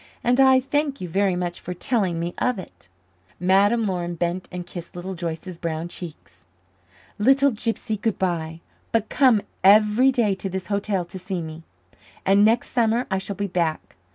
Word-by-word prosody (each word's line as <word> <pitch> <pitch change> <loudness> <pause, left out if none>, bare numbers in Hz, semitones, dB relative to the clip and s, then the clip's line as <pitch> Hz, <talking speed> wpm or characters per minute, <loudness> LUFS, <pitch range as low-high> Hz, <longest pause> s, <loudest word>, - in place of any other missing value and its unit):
And 245 +2 +2
I 265 -1 +7
thank 285 +2 -1
you 180 - -5
very 190 +2 +1
much 175 -1 -3
for 180 - -6
telling 185 -3 0
me 170 +1 -3
of 250 -3 +1
it." 90 - -11 0.5
Madame 200 +5 +3
Laurin 175 -3 -2
bent 175 +2 -2
and 180 -1 -5
kissed 175 -1 -9
Little 180 +2 -5
Joyce's 170 0 -5
brown 165 0 -3
cheek. 170 -2 -7 1.0
"Little 270 +5 +4
gypsy, 220 -1 -3
good 225 -2 0
by. 165 -3 -2 0.3
But 225 -1 0
come 250 -7 +4 0.2
every 210 +6 +6
day 230 -6 +2
to 190 +1 -4
this 190 0 -4
hotel 200 -3 -1
to 185 +2 -9
see 185 -1 -4
me. 160 0 -8 0.6
And 200 +1 +5
next 225 +3 +2
summer 235 0 +2
I 190 - +1
shall 195 +1 -5
be 205 - -2
back. 170 -4 -2
190 Hz, 175 wpm, -23 LUFS, 175-225 Hz, 1.0 s, I